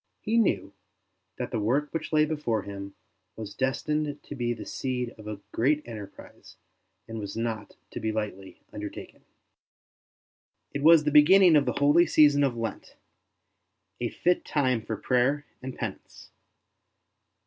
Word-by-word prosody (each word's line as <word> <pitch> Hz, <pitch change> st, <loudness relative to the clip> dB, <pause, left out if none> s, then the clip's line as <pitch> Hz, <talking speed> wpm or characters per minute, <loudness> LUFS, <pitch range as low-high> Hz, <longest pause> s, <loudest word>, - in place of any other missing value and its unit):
He 225 Hz, +2 st, +1 dB
knew 220 Hz, -, +1 dB, 0.6 s
that -, -, -5 dB
the -, -, -1 dB
work 135 Hz, +8 st, 0 dB
which 165 Hz, -, -4 dB
lay 155 Hz, -1 st, +4 dB
before 145 Hz, -9 st, -2 dB
him 100 Hz, -1 st, -8 dB, 0.4 s
was 110 Hz, -2 st, -7 dB
destined 145 Hz, +3 st, -2 dB
to -, -, -8 dB
be 120 Hz, -3 st, -2 dB
the 115 Hz, -, -5 dB
seed 125 Hz, -2 st, -3 dB
of 110 Hz, -3 st, -13 dB
a 105 Hz, -2 st, -5 dB
great 150 Hz, +5 st, +1 dB
enterprise 105 Hz, -4 st, -11 dB, 0.5 s
and 115 Hz, 0 st, -6 dB
was 100 Hz, 0 st, -6 dB
not 115 Hz, -2 st, -4 dB, 0.2 s
to -, -, -5 dB
be 110 Hz, -, -1 dB
lightly 105 Hz, -3 st, -5 dB
undertaken. -, -, -8 dB, 1.5 s
It 140 Hz, -, -3 dB
was 160 Hz, +1 st, +7 dB
the 150 Hz, -, 0 dB
beginning 170 Hz, +4 st, +7 dB
of 145 Hz, -2 st, +4 dB
the 125 Hz, -, -1 dB
holy 145 Hz, +5 st, +5 dB
season 145 Hz, -2 st, +5 dB
of 130 Hz, -4 st, 0 dB
Lent, 115 Hz, -2 st, -5 dB, 1.0 s
a -, -, -1 dB
fit 180 Hz, 0 st, +1 dB
time 130 Hz, -6 st, 0 dB
for 110 Hz, 0 st, -5 dB
prayer 135 Hz, +6 st, +1 dB, 0.2 s
and 130 Hz, 0 st, -6 dB
penance. -, -, -7 dB
130 Hz, 150 wpm, -27 LUFS, 110-150 Hz, 1.5 s, was